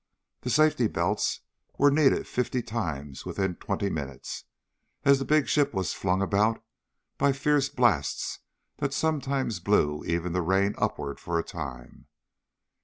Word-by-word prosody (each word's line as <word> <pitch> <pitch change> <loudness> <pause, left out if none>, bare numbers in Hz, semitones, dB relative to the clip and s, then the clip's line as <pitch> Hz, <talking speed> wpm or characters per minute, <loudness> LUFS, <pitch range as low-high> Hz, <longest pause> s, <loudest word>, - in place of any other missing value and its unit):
The 125 - -4
safety 150 -4 +4
belts - - 0 0.4
were 145 0 +5
needed 145 -1 +3
fifty 125 0 -1
times 80 - -4
within 95 -3 -2
twenty 100 - -2
minutes, 70 -8 -5 0.6
as 140 -1 +6
the 135 - -2
big 155 -1 +3
ship 145 -7 +2
was 95 -2 -1
flung 95 +1 0
about 105 +3 +1 0.6
by 140 -1 +4
fierce 140 0 +2
blasts 110 - +1 0.4
that 140 -1 -2
sometimes 140 -9 0
blew 75 -6 +1
even 85 0 -1
the 90 - +1
rain 95 +4 +2
upward 70 -1 -2
for 85 -1 -2
a 85 - 0
time. 65 -3 -8
105 Hz, 140 wpm, -27 LUFS, 85-140 Hz, 0.6 s, as